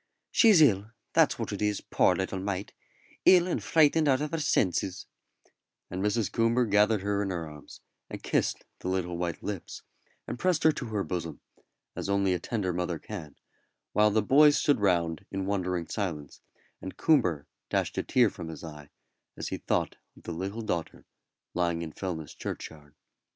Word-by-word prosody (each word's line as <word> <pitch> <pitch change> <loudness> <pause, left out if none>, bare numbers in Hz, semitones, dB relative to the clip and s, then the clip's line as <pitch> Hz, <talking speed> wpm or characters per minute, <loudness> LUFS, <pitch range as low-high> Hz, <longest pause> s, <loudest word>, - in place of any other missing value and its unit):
"She's 210 -9 +6
ill, 105 -6 +3 0.2
that's - - +4
what - - -4
it - - -5
is, 105 -1 +1
poor - - +2
little 95 0 -2
mite 95 0 -4 0.5
ill 180 -2 +7
and 180 - -2
frightened 155 0 +4
out 130 -2 +4
of 150 0 -3
her 165 - -1
senses;" 95 - 0 0.9
and 90 +1 -3
Mrs. 105 0 0
Coomber 115 +2 +2
gathered 105 0 +3
her 100 0 0
in 100 - -2
her 85 -3 -3
arms, 75 -1 -12 0.3
and - - -8
kissed - - 0
the - - -6
little 90 -2 -1
white 85 -1 -3
lips, 100 -4 -6 0.4
and - - -5
pressed 180 -4 +1
her 160 - +6
to 130 -5 -6
her 105 -3 -1
bosom, 85 -4 -4 0.6
as - - -4
only 100 -1 +2
a 90 - -1
tender 95 -1 -2
mother 90 -1 -2
can, 80 -7 -8 0.6
while 105 0 +5
the 105 0 +1
boys 145 +5 +6
stood 145 -5 +2
round 85 -3 +1
in 95 -1 -3
wondering 90 -3 -1
silence, 80 -9 -4 0.4
and 95 - -7
Coomber 90 - +2 0.2
dashed - - -1
a - - 0
tear 120 -5 +3
from 85 - -8
his 80 0 -8
eye 75 -3 -9 0.5
as - - -4
he - - -3
thought - - -1 0.2
of - - -17
the - - -6
little 95 +7 -4
daughter 85 -6 -4 0.5
lying 85 -1 0
in 80 - -6
Fellness 80 -6 -5
churchyard. 75 -2 -7
95 Hz, 175 wpm, -28 LUFS, 85-115 Hz, 0.9 s, ill